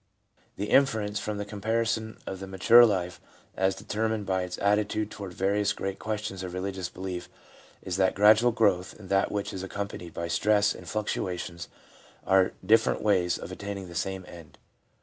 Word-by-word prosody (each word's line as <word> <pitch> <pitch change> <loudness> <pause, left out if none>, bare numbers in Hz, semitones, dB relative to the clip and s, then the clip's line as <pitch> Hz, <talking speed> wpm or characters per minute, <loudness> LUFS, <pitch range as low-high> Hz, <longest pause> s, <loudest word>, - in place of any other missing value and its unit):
The 105 +1 -4
inference 110 -7 +3
from 105 0 -4
the 105 - -3
comparison 110 +2 -1
of 95 - -5
the 95 - -7
mature 115 +6 +7
life 90 -4 -2 0.3
as 95 0 +1
determined 110 -1 -2
by 95 -1 0
its 90 0 -5
attitude 105 +1 +1
toward 100 -3 -7
various 100 +1 +1
great 95 -1 -4
questions 105 -3 -4
of 90 -1 -6
religious 95 -1 -3
belief 90 -1 -6 0.5
is 90 -1 -3
that 95 -1 +2
gradual 110 +4 +6
growth 100 -5 +1
and 95 -3 -12
that 100 0 +2
which 100 -1 -3
is 95 - -5
ac 95 - -6
companied 100 -4 -5
by 85 - -3
stress 105 +4 +2
and - - -10
fluctuations 90 -5 -3 0.6
are 95 -1 +4
different 110 +3 +3
ways 90 -4 +2
of - - -8
attaining 100 -1 -6
the - - -10
same 95 +1 -3
end. 85 -4 -13
100 Hz, 170 wpm, -28 LUFS, 95-105 Hz, 0.6 s, mature